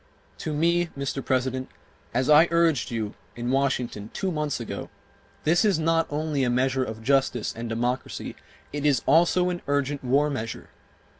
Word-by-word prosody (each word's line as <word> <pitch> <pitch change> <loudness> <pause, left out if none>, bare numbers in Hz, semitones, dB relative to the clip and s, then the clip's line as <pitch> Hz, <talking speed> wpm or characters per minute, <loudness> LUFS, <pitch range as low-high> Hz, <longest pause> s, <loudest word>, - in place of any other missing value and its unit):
To 155 - -3
me, 170 +3 +2
Mr. 140 -1 -3
President, 130 0 -1 0.4
as 125 +2 0
I 155 +3 +7
urged 170 -5 +2
upon 120 - -4
you 110 -2 -3 0.2
in 120 +1 -2
Washington 125 -6 0
two 190 - -1
months 150 -3 -2
ago, - - -6 0.5
this 170 +6 +3
is 205 -6 +3
not 165 0 +2
only 150 -2 -1
a 125 - +2
measure 130 +2 +1
of 110 -2 -6
justice 135 -3 +1
and 115 0 -5
democracy, 120 +3 -2 0.4
it 145 -1 -3
is 140 -5 +2
also 175 +4 +4
an 175 - -4
urgent 140 0 0
war 140 +4 +2
measure. 115 -5 -5
140 Hz, 165 wpm, -26 LUFS, 125-155 Hz, 0.5 s, I